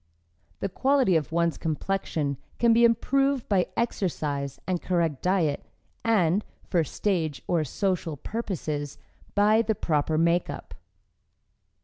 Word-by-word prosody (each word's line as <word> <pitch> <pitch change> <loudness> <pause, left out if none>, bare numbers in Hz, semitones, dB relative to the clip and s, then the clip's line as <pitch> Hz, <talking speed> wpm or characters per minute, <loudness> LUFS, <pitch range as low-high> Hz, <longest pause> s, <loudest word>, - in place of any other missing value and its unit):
The - - 0
quality 260 -1 +2
of 160 -1 0
one's 170 0 +1
complexion 155 -3 -2 0.2
can 235 -1 +4
be 235 +1 +5
improved 270 +3 +2
by 190 -3 +2
exercise 150 - -2
and 180 -2 -1
correct 165 -6 0
diet, 175 -6 +1 0.4
and, 205 -4 +3 0.2
for 170 -3 +2
stage 160 -3 -1
or 170 -3 +1
social 165 +1 -2
purposes, 155 - -4 0.4
by 210 +2 +5
the 220 -1 0
proper 155 -3 0
makeup. 170 +2 0
175 Hz, 115 wpm, -26 LUFS, 155-215 Hz, 0.4 s, be